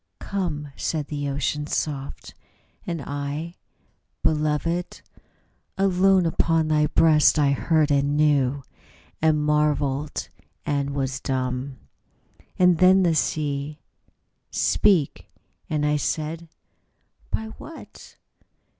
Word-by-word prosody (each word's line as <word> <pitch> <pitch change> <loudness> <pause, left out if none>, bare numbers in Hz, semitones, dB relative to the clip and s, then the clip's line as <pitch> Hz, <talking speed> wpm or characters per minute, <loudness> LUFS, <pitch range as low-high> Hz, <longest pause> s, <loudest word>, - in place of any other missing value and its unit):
' 90 - -53
' - - -53
" - - -52
Come," 155 -7 -2
said 150 -3 -3
the 145 -1 -3
Ocean, 145 +2 -2
soft; 140 -3 -4 0.5
and 165 -4 -3
I, 145 +4 -4 0.7
"Beloved, 155 +3 0 0.8
Alone 190 -1 +3
upon 165 -1 +1
thy 150 -1 +3
breast 155 -1 +4
I 145 -2 +3
heard 155 +1 +2
and 140 +1 +2
knew 140 -3 +2 0.6
And 155 -1 +3
marvelled 150 -1 0 0.4
and 140 -1 -1
was 135 -1 -2
dumb. 130 0 -3 0.3
' - - -42
' - - -31
And 180 -2 +4
then 185 +1 +6
the 170 -2 +3
sea: 150 -1 -1 0.7
"Speak!" 185 -9 +1 0.4
And 150 -1 0
I 150 0 +2
said, 160 +2 -3 0.8
"By 220 0 -3
what?" 320 - -12
150 Hz, 115 wpm, -24 LUFS, 140-165 Hz, 0.8 s, then